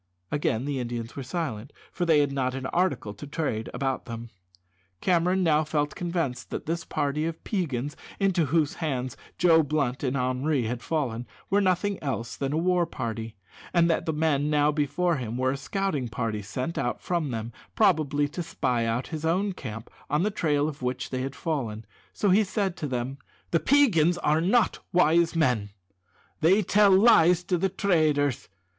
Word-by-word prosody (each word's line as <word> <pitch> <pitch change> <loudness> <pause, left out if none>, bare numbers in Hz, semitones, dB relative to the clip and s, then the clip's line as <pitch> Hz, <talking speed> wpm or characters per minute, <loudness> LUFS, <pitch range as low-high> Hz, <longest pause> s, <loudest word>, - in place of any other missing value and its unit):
_" - - +3
Again 130 -4 0
the 140 -2 -2
Indians 120 -1 -4
were 140 - -4
silent, 130 -4 -4 0.2
for 175 -1 -2
they 155 -3 +5
had 145 -1 0
not 130 -2 -1
an 135 0 -5
article 140 - 0
to 105 +8 -10
trade 140 -7 -2
about 135 -1 -2
them. 115 0 -7 0.7
Cameron 180 +1 +2
now 155 -2 +3
felt 150 -1 -1
convinced 165 -8 -3
that - - -5
this 165 +1 -2
party 150 +1 -1
of 165 -1 -6
Peigans, 145 - -2 0.2
into 190 -5 +2
whose 150 +1 +1
hands 130 -5 -2 0.2
Joe 165 -2 +5
Blunt 145 -4 -1
and 135 0 -1
Henri 130 +2 0
had 120 +2 -3
fallen, 125 -7 -2 0.2
were 200 +1 +4
nothing 190 +1 +1
else 125 -5 -3
than 135 -1 -2
a 155 - 0
war 175 0 +2
party, 115 -6 -5 0.4
and 170 -1 +5
that 165 - -1
the - - +2
men 150 -2 +1
now 150 0 +3
before 155 +3 0
him 120 -2 -4
were 130 +1 +1
a - - -2
scouting 150 -2 -2
party 110 -2 -3
sent 125 +11 -4
out 120 - -1
from 170 -5 -1
them, 115 -1 -4 0.2
probably 150 -8 +3
to 175 - -5
spy 125 -8 -1
out 115 +3 -2
his 155 -2 -5
own 185 +5 +1
camp, 115 -8 -7 0.2
on 150 +4 +1
the 210 - +1
trail 150 -6 +1
of 145 -3 -6
which 125 0 -3
they 130 -1 -2
had 135 +1 -4
fallen, 120 -10 -3 0.3
so 205 - +1
he 210 +4 +5
said 195 -2 -1
to 155 - -4
them: 130 +1 -3 0.3
"The 165 - +3
Peigans 180 - +4
are 155 -1 +2
not 215 +7 +2
wise 170 -1 +3
men; 125 -10 +1 0.7
they 190 +7 +4
tell 205 +2 +4
lies 185 -4 +6
to 180 0 0
the 195 - +1
traders. 155 - +1
150 Hz, 185 wpm, -27 LUFS, 130-170 Hz, 0.7 s, lies